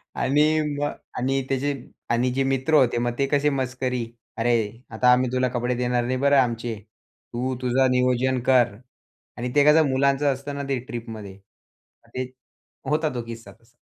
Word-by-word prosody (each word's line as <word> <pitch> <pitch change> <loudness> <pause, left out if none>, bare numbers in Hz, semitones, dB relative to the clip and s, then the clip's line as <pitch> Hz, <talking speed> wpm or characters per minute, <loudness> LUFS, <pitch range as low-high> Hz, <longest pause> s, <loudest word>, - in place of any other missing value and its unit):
आणि 150 +4 +2 0.2
मग 145 0 -1 0.3
आणि 135 +2 0
त्याचे 140 +2 0 0.4
आणि 120 +2 +1
जे 135 +1 +1
मित्र 135 +3 0
होते 125 -5 +4
मग 120 0 0
ते 140 - +3
कसे 145 +1 +2
मस्करी, 130 -2 -2 0.3
"अरे! 115 -1 0
आता 125 +3 +3
आम्ही 125 0 +2
तुला 130 0 +1
कपडे 125 0 -1
देणार 125 0 0
नाही 130 +1 -1
बरं 140 +1 +3
आमचे, 120 -2 0 0.6
तू 130 +2 -2
तुझं 130 +1 +2
नियोजन 125 +1 +2
कर" 125 -5 +4 0.6
आणि 125 +1 -3
ते 145 - +6
कसं 150 0 +5
मुलांचं 140 +1 +2
असतं 140 +2 -7
ना 140 - -4
ते 135 - 0
ट्रिपमध्ये 115 -5 -7
मग 100 0 -31
ते 130 - -1 0.6
होता 155 0 +1
तो 120 - -2
किस्सा 115 -3 -9
तसा. 115 +5 -25
130 Hz, 170 wpm, -24 LUFS, 120-135 Hz, 0.6 s, ते